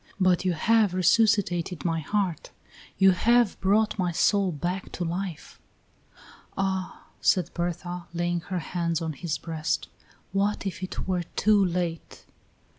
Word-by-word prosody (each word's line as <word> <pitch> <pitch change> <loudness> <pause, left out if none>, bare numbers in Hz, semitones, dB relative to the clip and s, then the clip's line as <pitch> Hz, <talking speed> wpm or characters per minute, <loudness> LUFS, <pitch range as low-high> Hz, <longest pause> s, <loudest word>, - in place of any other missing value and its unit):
but 185 -2 +3
you 185 -1 +1
have 210 +3 +2
resuscitated 185 -3 +2
my 165 -1 +1
heart; 180 0 -2 0.5
you 190 -1 +6
have 235 +3 +3
brought 210 +2 +2
my 180 -2 +1
soul 195 +2 +2
back 175 +5 -4
to 175 - -3
life." 175 -1 -5 1.0
"Ah," 190 -1 -2 0.2
said 185 - +2
Berta, 175 0 -4
laying 175 0 -1
her 180 +2 -5 0.2
hands 170 -2 0
on 160 -2 -3
his 155 +2 -3
breast, 160 -1 -3 0.4
"what 200 +2 0
if 190 -2 -4
it 185 - -5
were 185 -2 0
too 210 0 +4
late!" 175 -2 -3
180 Hz, 135 wpm, -26 LUFS, 170-195 Hz, 1.0 s, you